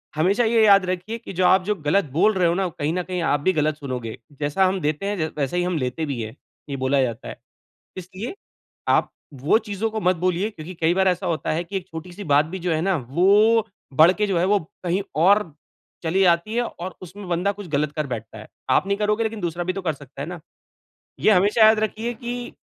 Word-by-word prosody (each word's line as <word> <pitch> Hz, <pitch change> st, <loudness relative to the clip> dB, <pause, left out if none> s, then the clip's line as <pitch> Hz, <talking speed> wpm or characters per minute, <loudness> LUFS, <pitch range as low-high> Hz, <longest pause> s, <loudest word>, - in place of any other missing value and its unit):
हमेशा 190 Hz, +9 st, +2 dB
ये 225 Hz, 0 st, +3 dB
याद 200 Hz, -2 st, +6 dB
रखिए 185 Hz, +5 st, -3 dB
कि 220 Hz, -, -10 dB
जो 180 Hz, +1 st, +1 dB
आप 185 Hz, +1 st, +5 dB
जो 210 Hz, +3 st, 0 dB
गलत 200 Hz, +5 st, +3 dB
बोल 200 Hz, +9 st, +3 dB
रहे 180 Hz, -2 st, +2 dB
हो 170 Hz, -, +2 dB
ना, 195 Hz, +1 st, 0 dB
वो 175 Hz, -, -3 dB
कहीं 150 Hz, +2 st, 0 dB
न 180 Hz, 0 st, -1 dB
कहीं 180 Hz, -1 st, -3 dB
आप 145 Hz, -2 st, +1 dB
भी 185 Hz, +7 st, +1 dB
गलत 155 Hz, -2 st, +1 dB
सुनोगे। 125 Hz, -6 st, -5 dB, 0.2 s
जैसा 150 Hz, +7 st, +2 dB
हम 185 Hz, +1 st, 0 dB
देते 150 Hz, +4 st, -1 dB
हैं 205 Hz, +1 st, -1 dB
ज 155 Hz, 0 st, -1 dB
वैसा 140 Hz, +4 st, -1 dB
ही 175 Hz, -, +1 dB
हम 180 Hz, -1 st, -1 dB
लेते 130 Hz, +3 st, -2 dB
भी 135 Hz, -6 st, -3 dB
हैं 110 Hz, +3 st, -6 dB, 0.3 s
ये 140 Hz, -, -3 dB
बोला 135 Hz, +1 st, +2 dB
जाता 120 Hz, -3 st, -3 dB
है। -, -, -7 dB, 0.6 s
इसलिए 185 Hz, -, -7 dB, 0.5 s
आप -, -, +3 dB, 0.3 s
वो 165 Hz, +10 st, +4 dB
चीज़ों 215 Hz, 0 st, -3 dB
को 220 Hz, 0 st, -3 dB
मत 185 Hz, -2 st, +2 dB
बोलिए 185 Hz, +4 st, 0 dB
क्योंकि 180 Hz, -3 st, -9 dB
कई 165 Hz, +1 st, +3 dB
बार 190 Hz, 0 st, +3 dB
ऐसा 180 Hz, -, -1 dB
होता 165 Hz, -2 st, -1 dB
है 165 Hz, +2 st, -1 dB
कि 195 Hz, +3 st, -6 dB
एक 185 Hz, -1 st, -4 dB
छोटी-सी 175 Hz, +4 st, -8 dB
बात 145 Hz, -1 st, +4 dB
भी 190 Hz, +4 st, -6 dB
जो 175 Hz, -1 st, -1 dB
है 155 Hz, -, +1 dB
ना 190 Hz, +1 st, +1 dB
वो 210 Hz, +7 st, +4 dB, 0.3 s
बढ़ 170 Hz, +3 st, +8 dB
के 210 Hz, +2 st, -1 dB
जो 190 Hz, -4 st, 0 dB
है 170 Hz, -, +2 dB
वो 205 Hz, +1 st, +3 dB, 0.3 s
कहीं 180 Hz, +3 st, 0 dB, 0.2 s
और 200 Hz, -3 st, +4 dB, 0.5 s
चली 170 Hz, +3 st, 0 dB
जाती 175 Hz, +4 st, +2 dB
है 240 Hz, -, +2 dB
और 185 Hz, -4 st, -7 dB
उसमें 185 Hz, +2 st, -10 dB
बंदा 180 Hz, +3 st, 0 dB
कुछ 205 Hz, -1 st, -9 dB
गलत 150 Hz, -1 st, 0 dB
कर 150 Hz, -1 st, -2 dB
बैठता 110 Hz, -3 st, -6 dB
है। 110 Hz, -, -11 dB, 0.2 s
आप 130 Hz, -, +3 dB
नहीं 200 Hz, 0 st, 0 dB
करोगे 210 Hz, +2 st, +1 dB
लेकिन 220 Hz, -1 st, -3 dB
दूसरा 175 Hz, -1 st, -3 dB
भी 185 Hz, -, -1 dB
तो 195 Hz, -, -5 dB
कर 165 Hz, -3 st, 0 dB
सकता 140 Hz, -2 st, -13 dB
है -, -, -5 dB
ना? 175 Hz, -2 st, -7 dB, 0.8 s
ये -, -, +4 dB
हमेशा 205 Hz, +3 st, +4 dB
याद 220 Hz, 0 st, +5 dB
रखिए 220 Hz, +2 st, -2 dB
कि 240 Hz, +1 st, -6 dB
180 Hz, 245 wpm, -23 LUFS, 155-205 Hz, 0.8 s, बढ़